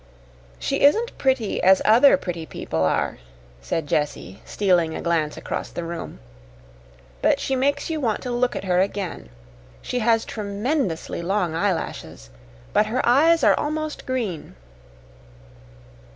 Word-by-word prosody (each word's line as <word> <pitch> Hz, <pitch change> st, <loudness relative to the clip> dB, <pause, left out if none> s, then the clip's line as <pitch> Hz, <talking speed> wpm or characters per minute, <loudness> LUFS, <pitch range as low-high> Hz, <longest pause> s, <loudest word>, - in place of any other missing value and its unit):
"She -, -, -2 dB
isn't 445 Hz, +12 st, +3 dB
pretty 260 Hz, -6 st, 0 dB
as 190 Hz, +1 st, +6 dB
other 245 Hz, +7 st, +6 dB
pretty 170 Hz, -8 st, -5 dB
people 80 Hz, 0 st, -3 dB
are," 80 Hz, -, 0 dB, 0.4 s
said 155 Hz, -, -2 dB
Jessie, 145 Hz, -9 st, -2 dB
stealing 175 Hz, -5 st, +1 dB
a -, -, -4 dB
glance 165 Hz, -3 st, 0 dB
across -, -, -4 dB
the 175 Hz, -, -5 dB
room; 170 Hz, -, -6 dB, 1.0 s
"but -, -, +3 dB
she 270 Hz, -, -1 dB
makes 280 Hz, +2 st, 0 dB
you 315 Hz, -1 st, -2 dB
want 225 Hz, -5 st, -1 dB
to 250 Hz, -, -4 dB
look 245 Hz, +1 st, 0 dB
at -, -, -4 dB
her 180 Hz, -1 st, +2 dB
again. 190 Hz, -, -3 dB, 0.5 s
She 250 Hz, -, -2 dB
has 225 Hz, -1 st, +2 dB
tremendously 205 Hz, -, -2 dB
long 180 Hz, -1 st, -1 dB
eyelashes, 165 Hz, -, -3 dB, 0.4 s
but 215 Hz, -, +3 dB
her 240 Hz, +3 st, -1 dB
eyes 320 Hz, +7 st, +4 dB
are -, -, +6 dB
almost 305 Hz, 0 st, -3 dB
green." 230 Hz, -, -3 dB
205 Hz, 135 wpm, -23 LUFS, 170-260 Hz, 1.0 s, as